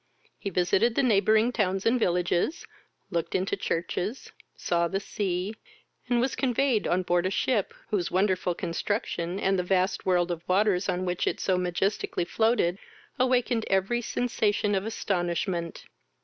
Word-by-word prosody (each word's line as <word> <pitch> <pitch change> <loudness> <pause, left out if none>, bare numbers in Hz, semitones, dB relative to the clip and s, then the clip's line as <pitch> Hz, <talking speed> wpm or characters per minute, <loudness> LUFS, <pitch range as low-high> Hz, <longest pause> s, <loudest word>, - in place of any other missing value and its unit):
He 200 - -3
visited 190 +6 +2
the - - +2
neighbouring 220 0 +4
towns 195 -4 0
and 240 +2 +3
villages, 180 - 0 0.5
looked 170 -1 -2
into 190 +1 0
the - - -19
churches, 180 +7 -3 0.2
saw 170 -1 0
the 195 +3 -2
sea, 195 0 -2 0.6
and 245 -1 +3
was 260 +3 0
conveyed 255 -3 +1
on 185 +1 +1
board 175 0 +1
a - - 0
ship, 205 +1 0 0.2
whose 190 -5 0
wonderful 185 -2 +1
construction, 175 0 -2
and 195 -1 +1
the - - 0
vast 185 +2 +1
world 180 -1 +2
of 170 -1 -3
waters 195 0 +2
on 185 0 -1
which 180 -1 -1
it - - -1
so 190 - +1
majestically 180 0 -1
floated, 200 -2 +1 0.4
awakened 250 -2 +2
every 195 +5 +1
sensation 215 -3 0
of 195 +2 0
astonishment. 175 -4 -2
190 Hz, 150 wpm, -27 LUFS, 180-220 Hz, 0.6 s, neighbouring